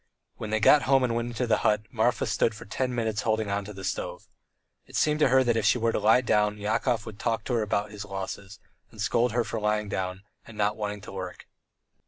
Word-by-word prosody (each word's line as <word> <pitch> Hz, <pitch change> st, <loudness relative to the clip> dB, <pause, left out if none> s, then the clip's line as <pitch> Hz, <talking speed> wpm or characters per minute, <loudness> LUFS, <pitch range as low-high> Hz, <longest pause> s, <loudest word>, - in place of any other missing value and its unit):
When 110 Hz, -, -5 dB
they 110 Hz, 0 st, +1 dB
got 145 Hz, +7 st, +6 dB
home 135 Hz, -1 st, +5 dB
and 120 Hz, -2 st, +1 dB
went 120 Hz, 0 st, -1 dB
into 120 Hz, +1 st, -2 dB
the 110 Hz, -2 st, +2 dB
hut, 105 Hz, -1 st, +2 dB
Marfa 115 Hz, 0 st, +1 dB
stood 110 Hz, -, +1 dB
for -, -, -10 dB
ten 125 Hz, +4 st, -2 dB
minutes 110 Hz, -3 st, -1 dB
holding 110 Hz, -2 st, 0 dB
on 100 Hz, 0 st, -1 dB
to 105 Hz, -, -8 dB
the 95 Hz, -2 st, -9 dB
stove. 95 Hz, -, -4 dB, 0.6 s
It -, -, -11 dB
seemed 150 Hz, 0 st, +2 dB
to 150 Hz, -, +5 dB
her 130 Hz, 0 st, +4 dB
that 120 Hz, -2 st, +2 dB
if 110 Hz, -, +1 dB
she 105 Hz, -, +4 dB
were 115 Hz, -1 st, +1 dB
to -, -, -1 dB
lie 110 Hz, +4 st, +5 dB
down 105 Hz, -3 st, +1 dB
Yakov 110 Hz, +2 st, 0 dB
would 110 Hz, -2 st, -9 dB
talk 115 Hz, -1 st, -1 dB
to 125 Hz, -, -3 dB
her 115 Hz, -, +2 dB
about 105 Hz, 0 st, -1 dB
his 105 Hz, -1 st, -7 dB
losses, 100 Hz, +1 st, -6 dB, 0.3 s
and 110 Hz, -, -16 dB
scold 115 Hz, +3 st, +1 dB
her 120 Hz, 0 st, +2 dB
for 110 Hz, 0 st, -4 dB
lying 105 Hz, 0 st, 0 dB
down 95 Hz, 0 st, -3 dB, 0.2 s
and 110 Hz, -, -12 dB
not 105 Hz, 0 st, +1 dB
wanting 105 Hz, -1 st, -4 dB
to -, -, -10 dB
work. 95 Hz, -2 st, -7 dB
110 Hz, 245 wpm, -27 LUFS, 105-115 Hz, 0.6 s, got